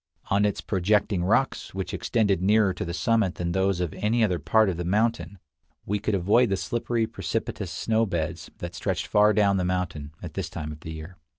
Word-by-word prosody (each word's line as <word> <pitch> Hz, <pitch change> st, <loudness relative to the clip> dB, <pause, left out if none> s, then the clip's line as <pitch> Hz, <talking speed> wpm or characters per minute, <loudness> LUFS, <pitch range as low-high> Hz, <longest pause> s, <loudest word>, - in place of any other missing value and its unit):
On 100 Hz, +1 st, +3 dB
its 105 Hz, -, -1 dB
projecting 100 Hz, -1 st, +1 dB
rocks, 110 Hz, +2 st, 0 dB
which 95 Hz, -2 st, -4 dB
extended 100 Hz, -6 st, +1 dB
nearer 105 Hz, 0 st, +3 dB
to -, -, -4 dB
the 85 Hz, -, -4 dB
summit 105 Hz, +1 st, +1 dB
than 85 Hz, -1 st, -2 dB
those 95 Hz, 0 st, +1 dB
of 90 Hz, -3 st, -2 dB
any 115 Hz, +2 st, +1 dB
other 90 Hz, -5 st, +1 dB
part 110 Hz, -1 st, +3 dB
of 90 Hz, -3 st, -1 dB
the 90 Hz, -, -3 dB
mountain, 105 Hz, +3 st, 0 dB, 0.5 s
we 105 Hz, +1 st, -1 dB
could 105 Hz, 0 st, 0 dB
avoid 105 Hz, +7 st, +3 dB
the 95 Hz, -, +1 dB
slippery, 120 Hz, +1 st, -1 dB
precipitous -, -, -4 dB
snow 115 Hz, 0 st, 0 dB
beds 85 Hz, -2 st, -3 dB
that 85 Hz, 0 st, -6 dB
stretched -, -, -2 dB
far 105 Hz, +1 st, +4 dB
down 100 Hz, -2 st, +3 dB
the 90 Hz, -, 0 dB
mountain 90 Hz, -5 st, -2 dB
at 85 Hz, -3 st, -7 dB
this 90 Hz, -1 st, -3 dB
time 75 Hz, -2 st, -5 dB
of 75 Hz, -, -9 dB
the 80 Hz, -, -8 dB
year. 80 Hz, +4 st, -9 dB
95 Hz, 205 wpm, -26 LUFS, 85-110 Hz, 0.5 s, far